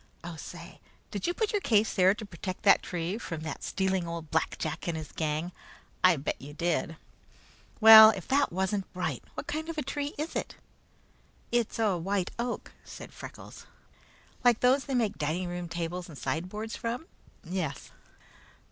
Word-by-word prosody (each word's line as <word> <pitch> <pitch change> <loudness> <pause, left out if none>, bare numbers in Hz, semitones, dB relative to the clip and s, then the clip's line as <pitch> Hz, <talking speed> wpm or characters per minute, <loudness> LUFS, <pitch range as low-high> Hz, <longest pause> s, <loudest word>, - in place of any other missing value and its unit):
Oh, 170 -1 -6
say, - - -10 0.3
did - - -3
you 350 - +1
put 440 +1 0
your 415 - 0
case 220 - +3
there 190 +1 +4
to 215 - -7
protect 185 0 -6
that 200 - +6
tree 175 +4 -3
from 165 -8 -5
that 155 - -5
stealing 190 -2 0
old 170 -2 -6
Black 160 - 0
Jack 155 +2 -4
and 170 -2 -1
his 155 -2 -7
gang? 155 +2 -2 0.5
I 185 -1 +7
bet 140 - -3
you 145 +2 -10
did! 165 0 -1 0.8
Well, 220 -1 +12
if 195 -5 -3
that 280 +1 +2
wasn't 190 +2 -1
bright! 180 0 -3
What - - -5
kind 315 +2 -4
of 330 - -5
a 300 - -1
tree 285 +2 -3
is 305 +3 -4
it?" - - -3 1.0
"It's 240 -2 0
a 210 -6 +1
white 190 +1 -1
oak," 240 +1 -3
said - - -10
Freckles. - - -11 0.8
"Like 245 -2 +4
those 260 +2 +4
they 275 - -2
make 225 -5 0
dining 175 +3 -2
tables 175 +1 -4
and 150 - -10
sideboards 210 +10 -3
from?" 240 +6 -4 0.4
"Yes." 165 -5 -4
185 Hz, 170 wpm, -29 LUFS, 170-230 Hz, 1.0 s, Well